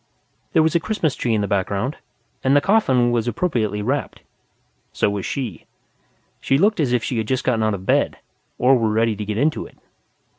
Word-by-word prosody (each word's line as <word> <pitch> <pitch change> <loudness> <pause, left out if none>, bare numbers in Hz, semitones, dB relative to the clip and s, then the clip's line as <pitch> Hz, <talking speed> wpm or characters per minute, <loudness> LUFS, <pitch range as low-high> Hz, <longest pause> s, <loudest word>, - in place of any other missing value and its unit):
There 160 - +5
was 160 - +1
a 170 - +3
Christmas 165 -6 -1
tree 115 -2 -1
in 105 - +1
the 100 - -1
background, 100 +7 -1 0.5
and 135 +1 +3
the - - +7
coffin 135 - +2
was 120 -1 0
appropriately 110 - -1
wrapped. 140 +6 -2 0.7
So 100 - +1
was 100 -2 -3
she. 120 - -5 0.7
She 135 - +1
looked 205 +5 +2
as 140 -6 +1
if 125 -2 +1
she 120 - -2
had 110 - -3
just 130 +1 -1
gotten 120 -3 +1
out 110 -1 +1
of 95 -1 -9
bed, - - +1 0.4
or 130 +2 +4
were 115 -3 +1
ready 110 +1 +1
to 105 +1 -5
get 105 0 -3
into 150 +5 0
it. - - -21
120 Hz, 200 wpm, -21 LUFS, 105-140 Hz, 0.7 s, the